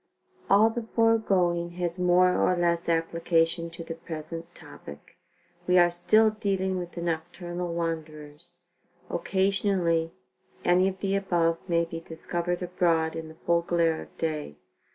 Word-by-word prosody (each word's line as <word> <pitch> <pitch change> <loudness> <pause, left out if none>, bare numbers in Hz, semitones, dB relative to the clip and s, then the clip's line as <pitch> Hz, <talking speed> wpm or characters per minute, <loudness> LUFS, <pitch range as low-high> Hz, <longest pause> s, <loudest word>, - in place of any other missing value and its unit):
All 215 +3 +6
the 225 0 -5
foregoing 185 -7 +2
has 175 0 -3
more 180 0 +4
or 180 - +2
less 170 -1 +1
application 165 0 +1
to 170 0 -9
the 165 - -6
present 165 0 -8
topic. 70 0 -12 0.5
We 180 0 +4
are 175 -1 +6
still 215 +6 +4
dealing 190 -3 -1
with 175 -1 -7
the 170 - -5
nocturnal 175 +1 -4
wanderers. 160 0 -5 0.5
Occasionally 190 -3 +1 0.5
any 180 +2 +4
of 190 -1 -4
the 195 -1 0
above 170 -4 +1
may 170 0 +2
be 165 0 -6
discovered 170 +2 -4
abroad 170 -3 +1
in 160 0 -5
the 160 - -12
full 170 0 +3
glare 170 -1 +1
of - - -14
day. 155 - -3
175 Hz, 140 wpm, -27 LUFS, 165-185 Hz, 0.5 s, All